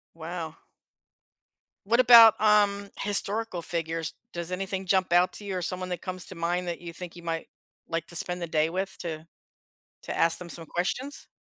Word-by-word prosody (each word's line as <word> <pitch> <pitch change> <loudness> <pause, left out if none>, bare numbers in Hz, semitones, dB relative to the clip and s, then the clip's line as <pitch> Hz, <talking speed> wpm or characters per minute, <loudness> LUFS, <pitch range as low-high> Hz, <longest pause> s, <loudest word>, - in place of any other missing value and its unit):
Wow. 165 -1 -5 1.3
What 235 +4 +3
about, 230 -3 +9
um, 205 -1 +3
historical 205 -1 -1
figures? 165 -2 -3 0.2
Does 170 0 -5
anything 190 +1 -3
jump 185 -1 +2
out 175 +1 +4
to 205 - -9
you 195 -2 -2
or - - -2
someone 185 +1 -3
that 180 - -4
comes 185 0 -5
to 185 - -8
mind 175 +2 -1
that 170 - -3
you 170 -1 -8
think 175 0 -8
you 175 - -11
might 165 -1 -3 0.4
like 165 0 -2
to 170 - -12
spend 180 +1 -3
the 170 - -2
day 155 0 +2
with 190 +3 -3
to 160 -2 -5 0.8
to - - -5
ask 165 0 +3
them 180 - -8
some 165 -1 -8
questions? 250 - -3
180 Hz, 185 wpm, -27 LUFS, 170-195 Hz, 1.3 s, about